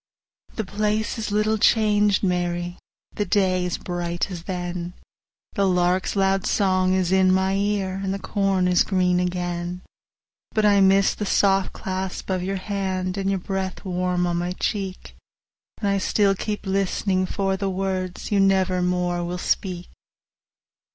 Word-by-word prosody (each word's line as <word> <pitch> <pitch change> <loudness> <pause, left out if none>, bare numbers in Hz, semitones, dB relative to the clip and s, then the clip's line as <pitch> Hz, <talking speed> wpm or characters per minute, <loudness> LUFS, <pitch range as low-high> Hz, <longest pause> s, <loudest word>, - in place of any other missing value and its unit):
The 220 - -2
place 215 +3 -1
is 215 -1 -3
little 215 +1 +1
changed, 210 -2 +3
Mary, 175 -1 -1 0.3
The 210 - -1
day 185 -1 +2
is 180 - -2
bright 175 +1 -3
as 175 -2 -7
then, 180 -2 -3
10 175 0 -5 0.6
The 200 -3 +1
lark's 180 +1 +1
loud 195 -1 +1
song 185 -2 +2
is 185 -1 0
in 190 -1 +4
my 190 +1 +2
ear, 195 -1 -1
And 190 - -1
the 195 - -2
corn 195 -2 0
is 180 -1 +4
green 180 -2 +1
again; 175 0 -3 0.7
But 215 -1 +3
I 200 -1 +5
miss 195 0 +4
the 210 - -4
soft 195 -1 +2
clasp 190 0 -4
of 185 -1 0
your 195 +2 -2
hand, 190 -2 -2
And 195 -1 -1
your 195 - +1
breath 190 +1 -4
warm 180 -1 0
on 175 -1 0
my 175 +1 -2
cheek, 190 0 -4 0.6
And 205 - -2
I 200 0 +2
still 200 +1 +2
keep 210 +2 -4
list'ning 190 -1 0
for 195 0 -1
the 195 0 -2
words 185 -1 -3
15 210 - -2
You 195 - +4
never 185 -1 +2
more 180 -1 0
will 175 +1 -3
speak. 180 0 -2
190 Hz, 165 wpm, -23 LUFS, 180-195 Hz, 0.7 s, I